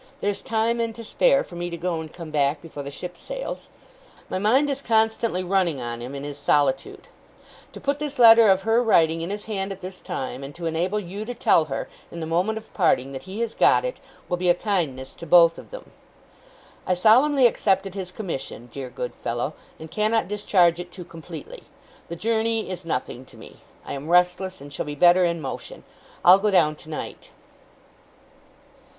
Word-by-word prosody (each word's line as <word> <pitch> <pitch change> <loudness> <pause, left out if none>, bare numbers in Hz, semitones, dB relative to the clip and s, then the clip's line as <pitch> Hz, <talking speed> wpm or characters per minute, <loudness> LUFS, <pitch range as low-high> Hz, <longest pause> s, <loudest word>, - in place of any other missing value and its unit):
There's 205 -1 -2
time, 230 +1 0
and 230 -1 -2
to 230 - -8
spare, - - +3
for 175 - -12
me 175 0 -4
to 170 - -5
go 170 -1 -2
and 155 -1 -9
come 165 -3 -9
back 145 0 +1
before 150 -2 -9
the 140 - -6
ship 180 +5 -8
sails. - - -7 0.6
My 185 - -1
mind 250 +9 +3
is 275 -1 -2
constantly 220 -4 +1
running 180 -5 +1
on 120 -1 -5
him, 125 +4 -6
in 140 - -6
his 145 0 -7
solitude; 145 -1 0 0.6
to - - -10
put 285 +1 -1
this 295 -1 -4
letter 230 -2 +8
of 190 0 +3
her 225 +2 +3
writing 165 -8 +3
in 170 - -4
his 205 +1 -5
hand 195 -2 -3
at 195 - -8
this 185 0 -8
time, 130 0 -5
and 140 +1 -9
to 175 - -7
enable 175 +6 0
you 200 +2 -6
to 245 +2 -5
tell 215 -9 +3
her, 135 -3 -4 0.2
in 170 - -8
the 160 - -3
moment 180 +7 0
of 220 0 -11
parting, 135 -8 +2
that 135 - -6
he 205 +4 -5
has 230 -1 -2
got - - +4
it, - - -4 0.3
will 180 - -1
be 180 0 +1
a 175 - +5
kindness 160 -11 -2
to 170 - -10
both 170 0 +6
of - - -13
them. - - -10 1.0
I 185 - +2
solemnly 255 +8 +5
accepted 195 -4 +2
his 190 -2 -5
commission, 165 - -6
dear 130 0 -6
good 125 0 -5
fellow, 120 +5 -3 0.3
and 160 0 -10
cannot 215 +1 +1
discharge 185 -4 +2
it 175 0 -7
too 180 -1 -9
completely. 165 - -10 0.5
The 170 - -4
journey 225 +1 -1
is 185 0 -6
nothing 125 -4 -3
to - - -18
me. - - -13 0.3
I - - -5
am 140 +3 -6
restless, 180 0 +2
and 140 0 -10
shall - - -4
be 145 - -4
better 175 +4 +5
in 170 -1 -1
motion. - - -7 0.4
I'll 185 +2 +9
go 210 +1 +1
down 165 -6 +3
tonight. 155 0 -8
180 Hz, 200 wpm, -24 LUFS, 160-220 Hz, 1.0 s, I'll